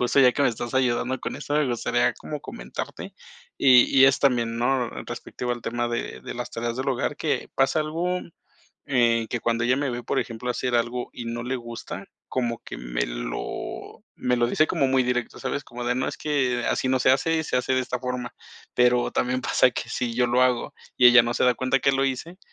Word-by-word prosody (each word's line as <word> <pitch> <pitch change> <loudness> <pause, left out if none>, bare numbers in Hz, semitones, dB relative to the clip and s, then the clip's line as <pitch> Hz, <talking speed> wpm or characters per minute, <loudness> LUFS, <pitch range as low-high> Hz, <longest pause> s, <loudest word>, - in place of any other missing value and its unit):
justo 125 +3 +1
ya 125 -2 +6
que 145 - 0
me - - +5
estás 120 0 -4
ayudando 130 0 +1
con - - -4
eso, 145 - -4
me 150 -1 +3
gustaría 120 0 +1
como 150 -1 -7
comentarte. - - -7 0.4
Y 125 -2 +7 0.2
y - - +10
es 135 - +4
también, 120 -4 +1
¿no?, 125 0 +1 0.2
respectivo 125 0 -4
al 120 - -5
tema 120 +1 -2
de 120 0 -4
de - - -6
las 120 0 -5
tareas 115 0 -3
del 130 +2 -2
hogar 130 -2 -1
que - - -1
pasa 135 +3 +2
algo, 170 +4 -1 0.7
eh, 115 -4 +2
que 120 - -2
cuando 115 0 0
ella 125 +2 +2
me 140 -1 -1
ve, 120 0 -4
por 135 - 0
ejemplo, 120 +1 -4
hacer 125 0 -1
algo 120 +1 -1
y 120 - -7
no 120 0 -4
le 130 +2 -2
gusta, 120 -1 -7 0.2
como 120 -2 -2
que - - -8
me - - -2
lo - - -6
me 125 0 0
lo 120 -1 +2
dice 155 +5 +2
como 135 - +1
muy 130 0 +3
directo, 125 -1 -2
¿sabes?, 145 - -3
como 120 -1 -8
de: 125 0 +1
"No 130 - -1
es - - -5
que, 130 -5 0
así 130 - 0
no 130 0 +2
se 130 - +5
hace 160 +5 +2
y 160 - -1
se 125 - -2
hace 125 +1 0
de 130 - +2
esta 125 -1 -3
forma", 125 -1 -4 0.4
pero 125 0 +3
también, 125 +1 0
pasa 125 - +4
que - - -4
si 120 -2 -2
yo 125 +1 +3
lo 120 +1 +2
hago 125 -2 +1 0.2
y 125 - +8
ella 120 0 +9
no 120 0 -2
se - - 0
da 125 - +5
cuenta 130 +2 +1
que 140 - +3
lo 135 - +1
hice, 160 +7 -4
125 Hz, 230 wpm, -25 LUFS, 120-130 Hz, 0.7 s, y